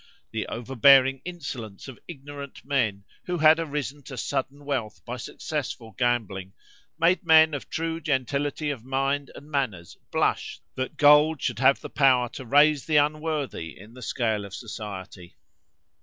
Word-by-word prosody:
The 110 -1 -3
over 120 +3 -6
bearing 135 +1 +6
insolence 140 - -7
of 130 - -10
ignorant 140 -3 -9
men, 115 -8 0 0.2
who 180 0 -2
had 155 0 +6
arisen 145 -2 -3
to 135 - -8
sudden 140 +4 -3
wealth 130 -7 -3
by 125 +1 -5
successful 140 -4 -5
gambling, 105 -7 -1 0.4
made 170 +2 +3
men 160 -2 +6
of 145 - -5
true 165 0 -3
gentility 145 +1 -1
of 125 -6 -7
mind 135 +2 -1
and 150 +2 -12
manners 110 - -2
blush - - 0
that 130 0 -4
gold 150 +1 +6
should - - -2
have 135 +1 +4
power 130 -4 +4
to 130 - -9
raise 145 +3 +4
the 155 -2 +3
unworthy 150 - -1
in 105 +5 -14
the 125 - -12
scale 110 -4 -1
of 100 0 -8
society. 100 -5 -8
135 Hz, 150 wpm, -26 LUFS, 120-150 Hz, 0.4 s, bearing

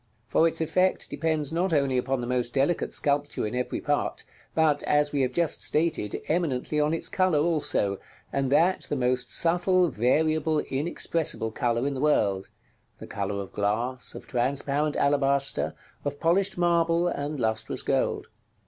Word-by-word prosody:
For 165 - +3
its 165 - -2
effect 185 +4 0
depends 155 -2 -1
not 180 +2 0
only 140 -3 +2
upon 130 +1 0
the - - -3
most 125 0 -2
delicate 140 +5 +1
sculpture 145 -3 0
in 105 - -4
every 125 0 -2
part, - - -1 0.3
but, 155 -2 +3
as 145 0 +3
we 145 - 0
have 130 -1 +1
just 170 +2 -1
stated, 155 -9 0
eminently 150 -3 -1
on 150 +1 +2
its 165 - 0
color 185 -4 +2
also, 145 - +1 0.3
and 135 -1 0
that 175 +6 +2
the - - 0
most 125 -1 0
subtle, 180 +1 +3
variable, 155 +6 +1
inexpressible 150 -4 -1
color 120 +2 0
in 140 - -1
the 130 - -4
world, 100 -10 +1 0.5
the - - -9
color 100 0 -3
of 100 - -7
glass, 115 +5 -1
of - - -9
transparent 140 +4 0
alabaster, 140 -1 +1 0.3
of 145 0 -4
polished 190 +3 +1
marble, 170 0 +2
and 145 -3 -3
lustrous 110 -1 -1
gold. - - 0
145 Hz, 155 wpm, -26 LUFS, 125-165 Hz, 0.5 s, For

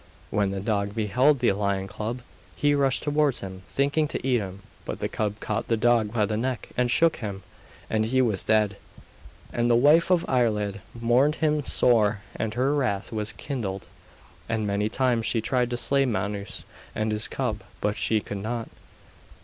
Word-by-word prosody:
When 100 -2 +1
the 95 0 -3
dog 100 0 -1
beheld 125 +7 +3
the 120 - +4
lion 100 -1 -1
cub 115 +5 -5 0.3
he 145 0 +2
rushed 140 -2 +1
towards 150 -2 +1
him, 95 -1 -7
thinking 145 +3 +1
to 135 - -4
eat 125 -2 +3
him; 95 -1 -7 0.2
but - - -5
the - - -2
cub 105 -1 -2
caught 110 +2 -2
the 115 - +1
dog 115 -2 +3
by 110 -2 +2
the 105 - -2
neck, 125 +1 -2
and 125 0 +1
shook 165 +6 +3
him, 100 -4 -6 0.4
and 110 0 +1
he 130 +4 +1
was 110 -7 +3
dead. 105 -2 +2 0.8
And 120 0 +1
the 120 - +5
wife 150 +8 +5
of 180 -2 +3
Iarlaid 105 -6 +1 0.2
mourned 125 +6 +3
him 150 -2 +1
sore, 110 -4 +3
and 110 -1 -3
her 130 +3 +2
wrath 125 -9 -1
was 110 -1 -2
kindled, 105 -9 -4 0.6
and 110 -2 0
many 105 +1 0
times 120 -1 +1
she 115 - +1
tried 125 +2 0
to 120 - -2
slay 135 +2 +2
Manus 100 -2 -3 0.3
and 110 0 0
his 105 +1 0
cub, 110 -6 -2 0.2
but 105 0 0
she 110 -1 +1
could 100 - -6
not. 115 +3 -4
115 Hz, 180 wpm, -26 LUFS, 105-130 Hz, 0.8 s, the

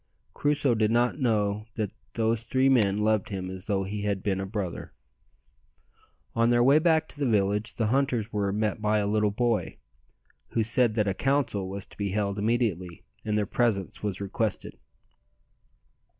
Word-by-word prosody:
Crusoe 145 -3 +1
did 110 -1 +2
not 120 +4 +1
know 105 -4 0
that 105 -3 -2 0.2
those 115 0 0
three 130 +3 +2
men 105 -7 +3
loved 110 +1 +1
him 95 -2 -4
as 95 +1 -8
though 100 -2 0
he 100 +2 -4
had 100 -2 -2
been 95 -2 0
a 95 - -4
brother. 100 -4 -5 1.4
On 115 +1 +3
their 120 0 +4
way 140 +4 +6
back 160 -1 +2
to 145 - -13
the 140 -4 +1
village 105 0 +1
the 115 - 0
hunters 125 -5 0
were 100 -1 0
met 105 0 -1
by 105 0 +2
a 105 - +1
little 105 0 +2
boy, 115 +2 -1 0.8
who 115 - +2
said 115 0 +2
that 105 -2 +1
a 100 - +1
council 130 -6 0
was 100 0 -4
to - - -19
be 100 -1 -2
held 100 -1 -1
immediately, 100 -6 -1 0.2
and 105 -1 -1
their 105 - +1
presence 105 -3 -1
was 100 -3 -2
requested. 100 +2 -3
105 Hz, 175 wpm, -27 LUFS, 100-120 Hz, 1.4 s, way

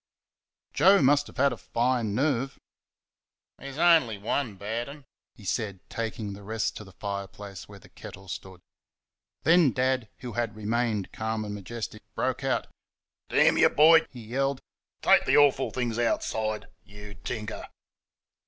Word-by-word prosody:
Joe 200 +1 +6
must 145 +2 +4
have - - -14
had 140 0 +3
a - - -7
fine 120 -3 0
nerve. 135 0 0 1.0
"That's 140 0 -8
on'y 160 -11 +4
one 110 +2 -2
bad 110 +6 -4
'n'," 145 -1 -11 0.3
he 105 - -14
said, 100 -1 -2
taking 110 -3 -4
the 100 - -10
rest 110 +2 -2
to - - -8
the 95 - -14
fireplace 100 -1 -7
where 100 - -11
the 95 - -17
kettle 95 0 -11
stood. 95 0 -8 0.8
Then 165 -3 +5
Dad, 130 -2 0
who 125 -3 -6
had 115 -1 -2
remained 110 -1 -1
calm 110 0 -3
and 105 - -5
majestic, 105 +3 -6
broke - - -1
out. - - 0 0.6
"Damn - - +4
y', - - +8
boy!" 160 +2 +6
he 125 - -11
yelled, 135 +4 -1 0.4
"take - - +5
th' - - +3
awful 140 -2 +4
things 120 -2 -2
outside 110 -2 -1 0.2
YOU 105 0 -11
tinker!" 105 +4 -6
115 Hz, 150 wpm, -27 LUFS, 105-135 Hz, 1.0 s, y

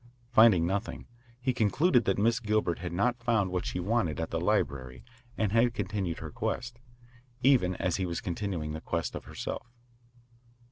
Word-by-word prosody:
Finding 110 -8 +6
nothing, 100 +5 -3 0.3
he 130 +1 0
concluded 125 - +3
that 95 - +1
Miss 115 +4 +2
Gilbert 105 -6 0
had 90 0 -5
not 120 +7 0
found 110 -6 +1
what 90 -1 -2
she - - -3
wanted 90 -5 0
at 80 - -3
the 80 - -1
library 70 - -1 0.3
and 105 -3 +1
had 115 +2 +3
continued 95 -5 -2
the - - -7
quest, 120 -1 -3 0.6
even 120 -9 +4
as 90 0 -1
he 95 -2 -1
was 85 -1 -3
continuing 85 -4 -3
the 80 - -5
quest 85 -1 -2
of - - -7
herself. - - -5
100 Hz, 170 wpm, -29 LUFS, 85-115 Hz, 0.6 s, Finding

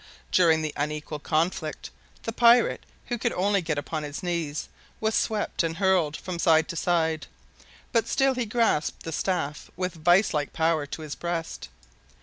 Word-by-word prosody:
During 160 -3 +4
the 155 -1 -3
unequal 150 +1 -3
conflict, 155 0 -1 0.3
the 225 - -2
pirate, 235 +1 +4 0.2
who 240 -2 -3
could 240 +1 0
only 200 +1 +2
get 160 -3 -2
upon 155 +2 -3
his 150 +4 -6
knees, 170 -4 -2 0.3
was 220 0 0
swept 215 -1 0
and 165 -1 -2
hurled 185 -5 +2
from 180 -2 -6
side 160 -2 +4
to 170 - -4
side, 160 -2 0 0.6
but 230 -2 +2
still 270 -1 +2
he 250 -3 -2
grasped 220 -8 +1
the 165 - -5
staff 160 -3 -2
with 180 0 -2
vice 175 +5 +3
like 145 -2 -1
power 160 -2 +1
to 155 - -6
his 150 -2 -5
breast. 165 - -4
165 Hz, 165 wpm, -26 LUFS, 155-195 Hz, 0.6 s, During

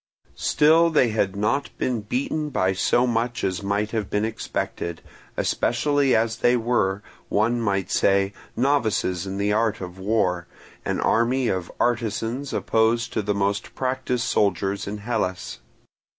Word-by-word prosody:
Still 160 +3 +4
they 140 -7 +3
had 100 -3 0
not 110 +8 0
been 125 -4 -1
beaten 140 +8 -2
by 95 -9 +1
so 120 +6 +2
much 120 0 -1
as 95 0 -1
might 100 +2 -1
have 110 -4 -2
been 105 +1 0
expected, 85 -6 -4 0.4
especially 140 +3 +1
as 115 +1 +1
they 125 0 +3
were, 110 -4 0 0.3
one 115 +3 +1
might 100 -4 -1
say, 100 0 +2 0.2
novices 110 -8 +1
in 95 +1 -4
the 100 +1 +1
art 110 0 +1
of 90 0 -8
war, 95 -4 0 0.4
an - - -1
army 120 +2 +2
of 90 -2 -2
artisans 120 +3 -1
opposed 115 +1 +1
to - - 0
the 105 0 -1
most 100 +1 -1
practised 130 -2 -1
soldiers 100 -2 0
in 105 +1 -4
Hellas. 105 -4 -3
110 Hz, 145 wpm, -24 LUFS, 100-120 Hz, 0.4 s, Still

